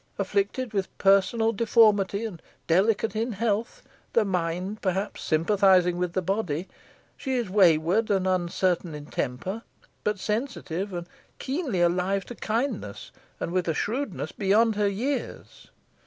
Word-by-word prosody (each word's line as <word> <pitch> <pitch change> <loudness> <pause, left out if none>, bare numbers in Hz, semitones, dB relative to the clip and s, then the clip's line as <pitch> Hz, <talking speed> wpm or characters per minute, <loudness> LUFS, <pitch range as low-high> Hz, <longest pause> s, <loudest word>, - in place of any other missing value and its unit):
Afflicted 205 +5 -1
with 195 -2 -3
personal 200 +4 +3
deformity, 210 -2 +3
and 185 -7 -7 0.2
delicate 200 +5 +2
in 230 +2 -1
health, 230 - -2 0.3
the 230 - +3
mind 180 +2 -2
perhaps 190 +1 -2
sympathising 180 +1 +3
with 180 -1 -1
the 185 - -1
body, 185 -3 -1 0.5
she 265 -2 -3
is 235 -7 -2
wayward 185 +2 +4
and 195 -2 +2
uncertain 180 -2 0
in 145 -1 -8
temper, 185 - -3 0.4
but 210 -1 0
sensitive 210 - -3
and 175 -1 -5 0.3
keenly 265 - -2
alive 180 +3 +1
to - - -8
kindness, 225 - -3 0.3
and - - -3
with 180 -1 0
a 165 - 0
shrewdness 260 - -2
beyond 215 +3 +2
her 205 -1 +2
years. 255 +8 -4
195 Hz, 135 wpm, -26 LUFS, 180-225 Hz, 0.5 s, wayward